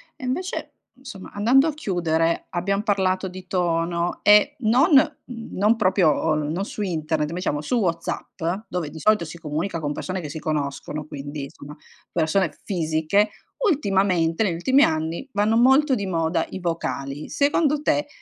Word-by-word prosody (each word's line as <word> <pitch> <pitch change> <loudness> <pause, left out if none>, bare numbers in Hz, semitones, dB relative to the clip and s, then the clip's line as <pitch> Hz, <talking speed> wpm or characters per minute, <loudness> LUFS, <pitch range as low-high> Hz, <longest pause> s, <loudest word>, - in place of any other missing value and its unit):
E 270 - -13
invece 360 +9 -3 0.3
insomma 245 -8 -10
andando 250 +8 +4
a 315 - -1
chiudere 170 - 0
abbiam 195 +3 0
parlato 190 -3 0
di 185 0 -10
tono 170 -1 -1
e 210 +8 +6
non, 255 - +3
mhmm, 270 -5 +1
non 210 +4 +4
proprio 185 -5 +3
o 150 +1 +1
non 155 +5 -2
su 210 - -6
internet, 155 -5 -1
ma 165 - -5
diciamo 150 -5 -2
su 200 - -1
Whatsapp, 170 -5 -3 0.3
dove 175 -4 -3
di 160 +2 -10
solito 210 +1 +3
si 170 +2 -9
comunica 165 +3 -3
con 145 -2 -2
persone 185 +4 -4
che 150 - -6
si 160 - -6
conoscono 150 0 -3
quindi, 145 0 -6
insomma 140 +1 -10 0.4
persone 165 0 0
fisiche, 165 +3 +1 0.4
ultimamente 195 - +1
negli 185 -6 0
ultimi 260 +12 +4
anni 160 +9 -1
vanno 210 +2 +2
molto 265 +3 +5
di 200 -4 -3
moda 165 -2 0
i - - -6
vocali. 150 -5 -4
Secondo 295 +1 +2
te, 295 -1 +1
180 Hz, 160 wpm, -23 LUFS, 160-215 Hz, 0.4 s, e